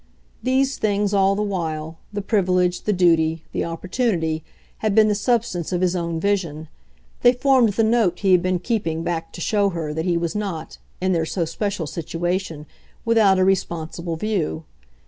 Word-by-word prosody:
These 265 +1 +1
things, 205 -1 +1
all 195 0 +3
the 210 - -1
while, 160 -5 -3
the 205 -1 -4
privilege, 180 -4 +1
the 210 - +2
duty, 165 -4 +2
the - - -1
opportunity, 165 -2 -1 0.4
had 215 -2 0
been 215 -1 +6
the - - +3
substance 210 -6 0
of 180 -1 0
his 185 0 +1
own 170 -2 -2
vision; 165 -5 -1 0.5
they 245 - +6
formed 255 -4 +3
the 225 - +2
note 220 -6 +2
he 195 -2 +3
had 180 -1 +6
been 185 0 +1
keeping 165 -6 -2
back 165 -1 -3
to 175 - -8
show 205 +2 +2
her 165 -4 -4
that 160 +2 -3
he 175 -2 +1
was 170 -1 -2
not, 195 -6 -5 0.2
in 185 +1 0
their 165 -3 +1
so 170 -1 -1
special 190 +1 -3
situation, 165 0 -3 0.4
without 220 -4 +4
a 185 - +3
responsible 170 -2 -1
view. 165 -4 -2
185 Hz, 175 wpm, -22 LUFS, 165-210 Hz, 0.5 s, been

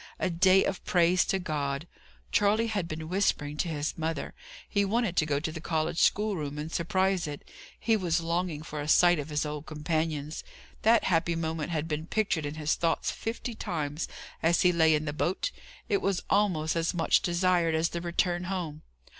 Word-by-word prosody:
A 185 - -1
day 185 +3 +5
of 190 - -3
praise 175 0 +3
to 195 - +1
God. 150 -3 -3 0.4
Charley 210 +2 +3
had 205 -6 -2
been 155 0 -5
whispering 160 -5 0
to 175 - 0
his 150 -2 -2
mother. 160 +1 -3 0.3
He 200 -2 +1
wanted 210 -2 0
to 155 - +3
go 145 -2 +1
to 160 +2 -3
the 160 0 -7
college 160 0 -1
schoolroom 180 -9 +1
and 150 +2 -5
surprise 185 0 +1
it. 145 -1 -7 0.3
He 225 - +2
was 175 -5 +1
longing 170 -2 -2
for 150 -1 -5
a 145 - -5
sight 175 +1 +5
of 145 +1 -5
his 150 0 -1
old 150 0 -5
companions. 155 -1 -2 0.4
That 225 +1 +5
happy 170 -1 +1
moment 160 -1 -2
had 160 -2 -2
been 155 0 -3
pictured 180 -9 0
in 145 - -5
his 155 0 0
thoughts 165 -1 0
fifty 230 +1 -4
times, 155 -8 -3 0.3
as 165 +1 +3
he 180 - +5
lay 160 -2 +4
in 150 0 -1
the 145 - -2
boat; 180 - -1 0.4
it 400 - +1
was 195 -2 0
almost 180 -7 +2
as 165 +1 0
much 165 - +3
desired 175 -2 +2
as 160 +1 +1
the 170 - -4
return 175 +1 0
home. 175 -5 -4
165 Hz, 190 wpm, -29 LUFS, 155-185 Hz, 0.4 s, day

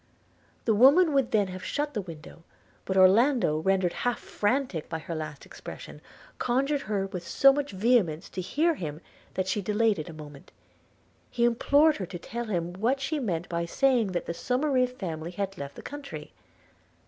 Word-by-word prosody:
The 225 - +3
woman 285 - +6
would 270 -3 +2
then 205 -3 +2
have 185 0 -7
shut 295 +6 -2
the 215 - -1
window; 165 -3 -11 0.4
but 190 - -1
Orlando, 195 - +4
rendered 185 +1 +1
half 245 -1 0
frantic 205 - -1
by 160 - -2
her 165 +1 -6
last 155 -3 -6
expression, - - -10 0.4
conjured 275 +4 +1
her 205 -5 -1
with 180 -3 -7
so 275 0 +6
much 290 0 -2
vehemence 190 -6 +2
to 185 - -5
hear 310 - +1
him, 155 - -6 0.3
that 185 0 -1
she 195 +2 0
delayed 210 0 +1
it 155 - -6
a - - -7
moment. 150 -2 -12 0.4
– - - -36 0.3
He 235 - -1
implored 285 +6 +4
her 185 - -4
to 180 - -6
tell 235 +7 -5
him 175 -5 -2
what 235 +9 0
she 295 +3 -2
meant 180 -9 -2
by 170 0 -2
saying 235 0 +2
that 175 - -2
the - - -3
Somerive 255 - 0
family 165 -5 -4
had 195 +2 -4
left 140 -4 -7
the - - -10
country. 290 -1 -8
205 Hz, 185 wpm, -27 LUFS, 175-260 Hz, 0.4 s, woman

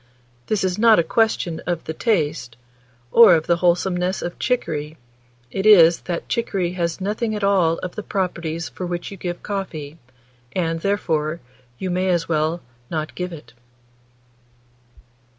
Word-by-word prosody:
This 215 -3 0
is 185 +1 -1
not 225 -1 +6
a 170 - +4
question 220 -6 0
of 175 -2 -1
the 160 - -5
taste, 155 - -1 0.5
or 230 -6 +8
of 160 -1 -1
the 170 - +2
wholesomeness 180 +1 +1
of 175 - -5
chicory; 155 - -2 0.5
it 195 - -2
is, 170 -5 +7
that 170 - -3
chicory 195 -7 -1
has 170 -1 -2
nothing 215 +3 -2
at 210 - -4
all 185 -5 +3
of 180 - -4
the - - -5
properties 170 -5 -3
for 180 - -6
which 175 +1 -4
you 195 - -8
give 175 -1 -5
coffee, 165 -7 -5 0.6
and, 165 -2 0
therefore, 165 -5 -1 0.4
you 185 +5 -3
may 185 +1 0
as 170 -2 +1
well 160 +1 0 0.3
not 155 -1 -3
give 180 0 -4
it." 135 -8 -11
175 Hz, 150 wpm, -22 LUFS, 165-195 Hz, 0.6 s, or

